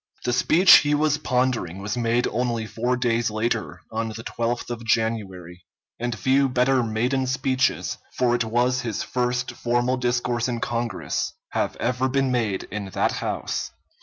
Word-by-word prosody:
The 125 - +1
speech 175 +9 +7
he 150 0 +2
was 150 0 +1
pondering 125 -8 0
was 105 +4 -3
made 120 0 +1
only 120 -1 -1
four 120 +3 -1
days 120 -2 +1
later, 110 +1 -2
on 115 0 -2
the 115 +1 -7
12th 120 +1 -2
of 120 -1 -5
January, 100 -6 -2 0.4
and 120 -1 -2
few 135 +4 +3
better 125 +1 +3
maiden 120 +4 0
speeches 130 0 0 0.2
for 125 -1 +3
it 120 -1 +2
was 120 +3 +1
his 115 -4 -3
first 125 0 -1
formal 120 +2 0
discourse 120 -1 0
in 120 -2 -2
Congress 115 -3 -2 0.2
have - - -1
ever 125 +2 0
been 135 0 +1
made 110 -6 0
in 105 -1 -4
that - - +1
House. - - -3
120 Hz, 160 wpm, -24 LUFS, 115-125 Hz, 0.4 s, speech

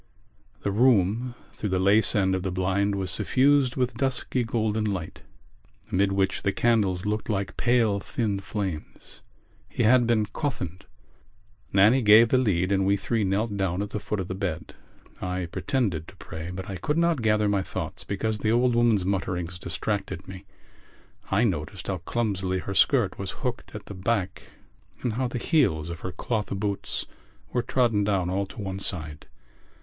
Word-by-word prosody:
The 100 - -1
room 115 +1 +3 0.2
through 105 - -4
the 95 - +1
lace 100 +3 +4
end 95 -2 +2
of 95 - 0
the 95 - -2
blind 95 +2 0
was 95 -1 -2
suffused 135 -1 +3
with 125 -1 0
dusky 130 -1 0
golden 110 -1 0
light 95 -6 -3 0.7
amid 100 +1 +2
which 95 0 0
the 100 - +1
candles 100 -6 +1
looked 105 +2 -2
like 100 -2 -2
pale 120 -4 +2
thin 105 -1 -2
flames. 95 -4 -6 0.5
He - - -1
had 120 +1 +5
been 110 -3 +3
coffined. 100 - -4 0.9
Nannie 105 +7 +5
gave 110 +1 +7
the 130 - +4
lead 95 -6 +1
and 95 -1 +2
we 100 +1 +3
three 110 +3 -1
knelt 100 +3 0
down 95 0 0
at 105 - -7
the 105 - -2
foot 105 +1 -3
of 95 - -3
the 95 - -3
bed. 90 -4 -4 0.5
I 90 -1 -2
pretended 95 - -1
to - - -13
pray 80 +2 -7
but 95 +1 -6
I 95 - -5
could 150 - -1
not 170 -5 +2
gather 105 -1 +2
my 100 -1 +2
thoughts - - -5
because 105 +2 -2
the 110 +2 +1
old 120 +1 +3
woman's 115 -5 +3
mutterings 90 -2 -2
distracted 95 +1 -3
me. 95 0 -9 0.8
I 100 +4 +3
noticed 90 -2 -2
how 95 - -2
clumsily 95 -1 -1
her 100 +2 -4
skirt 105 -1 +3
was 100 -1 -3 0.2
hooked 125 -2 -4
at 105 - -7
the - - -8
back 95 0 -1 0.6
and 120 - 0
how 130 +3 0
the 125 - -4
heels 100 - +1
of 85 - -6
her 90 - -5
cloth 105 +4 -2
boots 100 0 -3 0.5
were 125 - +2
trodden 115 -5 +1
down 95 -3 0
all 100 +1 -1
to 105 - -12
one 95 -1 -4
side. 80 -6 -3
100 Hz, 175 wpm, -26 LUFS, 95-115 Hz, 0.9 s, gave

